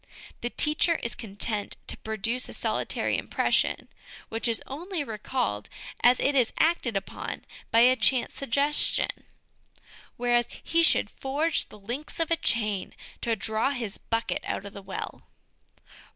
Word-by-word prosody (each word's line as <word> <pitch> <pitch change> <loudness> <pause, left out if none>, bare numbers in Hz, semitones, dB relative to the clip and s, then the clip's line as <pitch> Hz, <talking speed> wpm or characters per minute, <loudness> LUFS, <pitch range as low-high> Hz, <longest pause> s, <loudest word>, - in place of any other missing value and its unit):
The 240 - -1
teacher 305 +5 +3
is 235 - -2
content 205 -1 -2
to - - 0
produce 220 +3 -1
a - - -8
solitary - - 0
impression - - +1 0.4
which 225 +2 -1
is 230 -1 0
only 335 +4 -3
recalled 215 - -2 0.3
as 245 +1 +6
it 285 - +2
is 255 -4 +3
acted 315 -10 +2
upon 195 - -5 0.2
by 230 - +5
a 250 +2 +7
chance 245 +2 +2
sugges 280 +3 +1
tion; - - -1 0.9
whereas 240 0 +2 0.2
he 335 - +3
should 330 - +4
forge 295 +4 0
the - - -12
links 245 +12 -6
of 330 0 0
a - - +6
chain 215 - 0 0.3
to 230 -1 +1
draw 220 +4 0
his 235 -7 -4
bucket 230 0 -1
out 195 - -3
of 200 - -8
the 200 - -8
well. 195 0 -6
240 Hz, 150 wpm, -27 LUFS, 220-280 Hz, 0.9 s, a